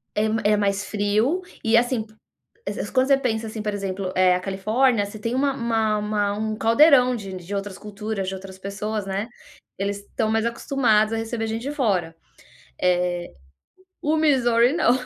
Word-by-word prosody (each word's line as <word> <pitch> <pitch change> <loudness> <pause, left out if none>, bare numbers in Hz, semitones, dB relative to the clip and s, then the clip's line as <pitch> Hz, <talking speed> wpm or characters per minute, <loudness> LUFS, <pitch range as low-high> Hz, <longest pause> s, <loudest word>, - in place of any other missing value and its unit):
É 210 - +2 0.3
é - - +4
mais 200 0 0
frio, 215 - +1 0.2
e, 225 +1 +4
assim, 245 -1 +2
pu 215 -1 -21 0.5
es- - - -3
es - - -4
quando 260 0 +2
você 275 -1 +5
pensa 225 -4 -2
assim, 215 0 -6
por 210 -1 -2
exemplo, 195 -1 -3
eh, 185 -1 +4
a - - -1
Califórnia, 210 +5 +1
você 205 +2 -9
tem 230 +3 -3
uma 275 +1 +1
uma 225 -3 0
uma 210 -1 0
um 215 0 -2
caldeirão 250 +2 +5
de 195 -4 -7
de 185 +2 -6
outras 200 -1 -4
culturas, 210 -1 -5
de 190 - -3
outras 190 0 -10
pessoas, 200 +1 -4
né. 195 +3 -3 0.5
Eles 200 0 -1
estão 215 +2 -3
mais 225 +1 +1
acostumados 235 -3 +1
a - - 0
receber 225 0 -3
gente 225 +2 -3
de 285 - -3
fora. 190 - 0 0.7
Eh, 180 -1 +2 0.9
o 310 0 +1
Missouri, 250 -4 +3
não. 315 -8 +3
215 Hz, 185 wpm, -23 LUFS, 200-235 Hz, 0.9 s, você